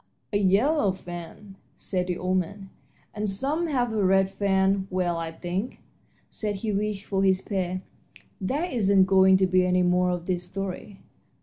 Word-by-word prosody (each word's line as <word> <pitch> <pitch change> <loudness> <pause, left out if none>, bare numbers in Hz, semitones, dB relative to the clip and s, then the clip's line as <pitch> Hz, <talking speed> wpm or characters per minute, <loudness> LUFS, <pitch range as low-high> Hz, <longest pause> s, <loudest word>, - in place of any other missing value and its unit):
"A 205 - +2
yellow 205 +5 +3
fan," 180 +2 -10 0.2
said 180 -2 -2
the 180 -1 -2
old 185 +1 +1
man. 195 +2 -7 0.4
"And 210 -1 -2
some 280 - -1
have 245 -6 0
a 210 -2 +1
red 190 0 +3
fan. 195 0 +1
Well, 180 -2 -1
I 165 -1 -3
think," 180 +7 -4 0.5
said 210 -1 -3
he, 215 +2 -3
reaching 205 0 -2
for 195 -1 0
his 190 -1 +3
pail, 185 -2 -3 0.6
"there 280 - 0
isn't 200 - +3
going 190 0 +5
to 190 - +3
be 185 0 +3
any 180 0 +2
more 180 0 +2
of 175 -1 -3
this 180 -1 -1
story." 195 +1 -6
190 Hz, 170 wpm, -26 LUFS, 185-205 Hz, 0.6 s, going